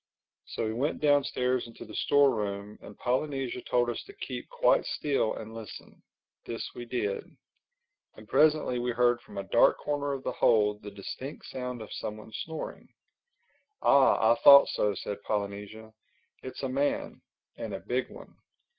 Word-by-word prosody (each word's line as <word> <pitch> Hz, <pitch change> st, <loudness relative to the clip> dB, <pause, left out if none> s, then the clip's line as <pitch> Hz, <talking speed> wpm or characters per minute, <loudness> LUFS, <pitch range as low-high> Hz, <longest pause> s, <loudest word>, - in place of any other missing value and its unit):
So -, -, -3 dB
we 110 Hz, -, -2 dB
went 135 Hz, +7 st, -1 dB
downstairs 130 Hz, -4 st, +2 dB
into 115 Hz, -, -11 dB
the -, -, -12 dB
store 145 Hz, -2 st, +4 dB
room 100 Hz, 0 st, -4 dB
and 105 Hz, -, -12 dB
Polynesia 130 Hz, 0 st, -1 dB
told 120 Hz, 0 st, +1 dB
us 120 Hz, -, -3 dB
to 400 Hz, -, -12 dB
keep -, -, -6 dB
quite -, -, +3 dB
still 140 Hz, -7 st, -1 dB
and 110 Hz, 0 st, -8 dB
listen. 115 Hz, -2 st, -10 dB, 0.4 s
This 115 Hz, -, -5 dB
we 120 Hz, -, -7 dB
did. 105 Hz, -5 st, -2 dB, 0.9 s
And 110 Hz, -, -14 dB
presently 150 Hz, -2 st, +3 dB
we 120 Hz, 0 st, -1 dB
heard 120 Hz, 0 st, +2 dB
from -, -, -13 dB
a 100 Hz, -, -2 dB
dark 115 Hz, +4 st, +4 dB
corner 145 Hz, -1 st, -2 dB
of 135 Hz, -1 st, -5 dB
the -, -, -2 dB
hold 105 Hz, -2 st, +2 dB
the 105 Hz, -, -7 dB
distinct 105 Hz, +8 st, -8 dB
sound 125 Hz, -3 st, -5 dB
of 110 Hz, -, -10 dB
someone 110 Hz, +1 st, -6 dB
snoring. 160 Hz, -1 st, -6 dB, 0.9 s
"Ah, 130 Hz, -5 st, +5 dB
I -, -, -6 dB
thought 140 Hz, 0 st, +10 dB
so," 105 Hz, -1 st, 0 dB
said 100 Hz, +2 st, -5 dB
Polynesia. 105 Hz, +2 st, -4 dB, 0.5 s
"It's 130 Hz, +1 st, -8 dB
a -, -, 0 dB
man—and 140 Hz, +3 st, -4 dB
a -, -, -5 dB
big -, -, -2 dB
one. -, -, -13 dB
120 Hz, 160 wpm, -29 LUFS, 110-140 Hz, 0.9 s, thought